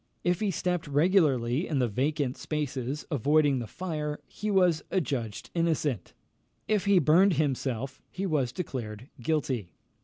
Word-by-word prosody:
If 175 -1 +1
he 210 - 0
stepped 180 -2 -1
regularly 145 -3 +3
in 150 - -1
the 125 -2 +2
vacant 135 +4 0
spaces, 145 -2 -3
avoiding 145 0 +3
the 120 - -5
fire, 150 -2 -4
he 210 - -4
was 180 -5 +3
adjudged 125 - -2
innocent; 155 - 0 0.5
if 210 -3 +1
he 200 -1 +5
burned 175 +5 +5
himself, 135 -3 -1
he 190 +2 -4
was 145 -9 +1
declared 120 -6 -5
guilty. 125 - -1
150 Hz, 140 wpm, -28 LUFS, 130-175 Hz, 0.5 s, he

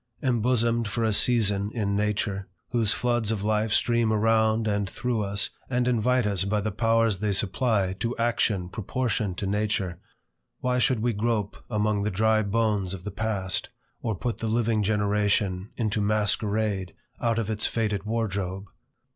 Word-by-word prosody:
Embosomed 120 -2 +1
for 115 +3 -2
a 110 -1 +2
season 105 -3 +3
in 100 -3 0
nature, 105 -1 -1 0.2
whose 115 -4 +2
floods 120 -3 +1
of 105 -3 -2
life 110 +1 +1
stream 115 0 +2
around 110 0 +2
and 100 -2 0
through 120 0 -2
us, 100 0 -1 0.2
and 125 -1 +1
invite 125 0 +2
us 100 -3 0
by 105 +2 0
the 105 +1 -2
powers 115 -1 +2
they 105 0 0
supply, 100 0 +1
to 115 +5 -3
action 115 -5 +1
proportioned 110 -1 -2
to - - -2
nature, 100 -3 -1 0.6
why 125 0 0
should 125 -2 +2
we 120 -1 +1
grope 105 -1 -1
among 105 -2 +1
the 105 - 0
dry 110 +2 +2
bones 105 -3 0
of 90 - -11
the 105 - -5
past, 100 -3 -2 0.3
or 110 -3 -1
put 115 +5 -3
the 115 - -2
living 115 -1 +1
generation 105 -2 +1
into 110 -3 0
masquerade 105 -2 0 0.3
out 115 -1 +1
of 115 -3 -1
its 110 -1 +1
faded 105 -3 -1
wardrobe? 100 -4 -2
105 Hz, 160 wpm, -26 LUFS, 100-115 Hz, 0.6 s, season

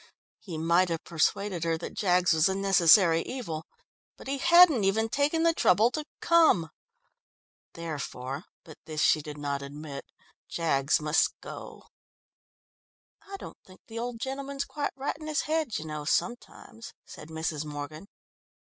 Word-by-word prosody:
He 175 -6 -7
might 170 +3 +2
have 165 -1 -3
persuaded 175 +2 -1
her 165 -1 0
that 165 - -7
Jaggs 180 -3 +2
was 160 +2 +3
a 190 - -1
necessary 180 -3 +5
evil, 165 -12 -6 0.5
but - - -13
he 275 0 -2
hadn't 340 - +6
even 220 +3 +1
taken 295 +6 +1
the 335 0 +4
trouble 220 - +3
to 305 +1 -4 0.2
come. 320 - +4 1.0
Therefore 145 -3 -5 0.2
but 155 - -14
this 155 -2 -2
she 155 - +4
did 150 0 -8
not 140 -1 -3
admit 140 0 -8 0.4
Jaggs 150 -3 +1
must 150 0 +1
go. - - -10 1.5
"I 395 - -6
don't - - -11
think 185 0 -18
the 230 0 -7
old 240 -1 -4
gentleman's 275 +2 -4
quite 290 - -4
right 270 +1 -3
in 310 - -8
his 305 -2 0
head, 310 -6 -1
you 155 - -6
know, 150 -1 -5
sometimes," 235 +5 -3
said 150 - -11
Mrs. 160 -1 -3
Morgan. 150 +4 -7
175 Hz, 150 wpm, -28 LUFS, 155-245 Hz, 1.5 s, hadn't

